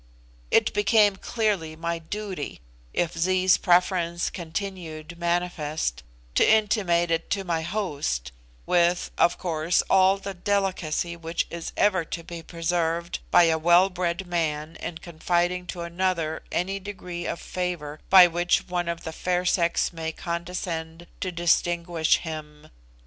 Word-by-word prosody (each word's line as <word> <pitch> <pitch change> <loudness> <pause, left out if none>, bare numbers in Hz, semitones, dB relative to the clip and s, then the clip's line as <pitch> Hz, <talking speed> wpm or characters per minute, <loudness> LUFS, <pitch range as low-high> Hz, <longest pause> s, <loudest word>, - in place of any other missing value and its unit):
It - - +3
became 205 -1 +4
clearly 195 -7 -1
my 170 +1 -3
duty, 190 -1 -5 0.3
if 175 -1 -1
Zee's 185 +2 +3
preference 175 -1 +2
continued 170 -2 -6
manifest, 170 - -1 0.3
to - - +4
intimate 200 -6 +3
it 165 0 -1
to 200 -1 -1
my 170 -3 -1
host, 150 - -2 0.3
with, 175 0 +2
of 170 - +4
course, 165 -1 +1
all 190 0 +5
the 195 0 -6
delicacy 180 -3 -1
which 165 0 -2
is 170 -1 -5
ever 190 -4 +3
to 165 +1 -6
be 170 0 -8
preserved 170 0 -1
by 175 - +6
a 160 -1 +3
well 175 +4 +5
bred 180 +1 -2
man 160 -2 -2
in 170 - -5
confiding 175 +2 -1
to 175 - -5
another 170 -2 -1
any 195 +3 -1
degree 180 -3 -6
of - - -3
favour 170 -5 -4
by 190 -2 +10
which 175 0 +1
one 175 -1 -2
of 170 0 -4
the 160 - -5
fair 180 +2 -1
sex 170 -1 +1
may 160 -1 -3
condescend 170 -1 -4
to 185 - -2
distinguish 170 -1 +2
him. 150 -2 -8
175 Hz, 140 wpm, -25 LUFS, 165-185 Hz, 0.3 s, by